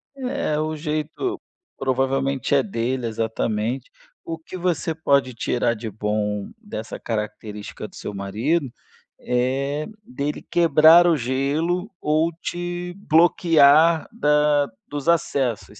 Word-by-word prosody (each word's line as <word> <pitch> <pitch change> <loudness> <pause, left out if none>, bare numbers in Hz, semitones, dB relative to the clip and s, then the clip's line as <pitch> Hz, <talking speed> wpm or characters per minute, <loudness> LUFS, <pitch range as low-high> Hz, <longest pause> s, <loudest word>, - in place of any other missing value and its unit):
É, 250 - -2
o 155 0 -2
jeito 155 - -3 0.4
provavelmente 135 0 0
é 140 - +5
dele, 125 - -2
exatamente. 115 +2 -2 0.3
O 165 -1 -5
que 160 +3 -11
você 175 -2 -1
pode 140 -5 +1
tirar 120 0 0
de 110 0 -6
bom 105 0 -2
dessa 115 - -7
característica 105 -1 -5
do - - -18
seu - - -6
marido, 115 - -1 0.5
é 135 +4 -1 0.2
dele 150 - -4
quebrar 165 +1 +6
o 170 - +4
gelo 145 - -1
ou 155 +2 +2
te 175 0 -4 0.2
bloquear 160 -1 +5
da 150 -7 +2 0.2
dos 145 +3 -3
acessos, 140 -9 0
145 Hz, 115 wpm, -23 LUFS, 120-165 Hz, 0.5 s, quebrar